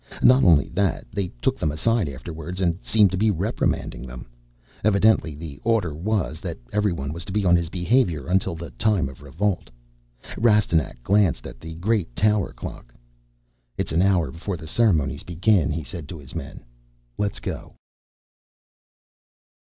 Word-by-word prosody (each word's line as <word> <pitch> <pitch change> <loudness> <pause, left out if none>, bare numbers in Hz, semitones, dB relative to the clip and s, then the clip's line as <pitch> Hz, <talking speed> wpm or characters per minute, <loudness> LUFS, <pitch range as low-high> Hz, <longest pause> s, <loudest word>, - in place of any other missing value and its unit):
Not 130 +2 +7
only 80 -6 +5
that, 95 0 0
they 100 -2 -2 0.2
took - - +1
them 75 - 0
aside 100 +3 +1
afterwards 80 +6 -6
and 90 -1 +1
seemed 105 -3 +4
to 95 - -1
be 110 +1 +3
reprimanding 95 - -1
them. 60 -1 -9 0.6
Evidently 105 -6 +3
the 75 -2 -8
order 110 -9 +1
was 90 -1 -1
that - - -5 0.2
everyone 85 -9 0
was 85 +1 -3
to - - -6
be 100 0 0
on 85 -1 +5
his 85 -2 0
behavior 90 - +1
until 90 -1 +1
the 85 0 -8
time 95 -12 +1
to 70 - -17
revolt. 90 +7 -2 0.7
Rastignac 105 - +2
glanced 100 -1 +2
at - - -9
the 80 +4 -8
great 90 - -1
tower 105 -2 +2
clock. - - -9 0.8
"It's - - -2
an 80 +2 +2
hour 90 -7 +2
before 90 +5 -4
the 80 - -10
ceremonies 80 - +2
begin," 90 -1 +2
he 80 +2 -2
said 75 +3 -8
to 85 - -6
his 70 -3 -12
men. 80 -5 -7 0.6
"Let's 105 -1 -1
go." - - -6
85 Hz, 160 wpm, -24 LUFS, 80-105 Hz, 0.8 s, Not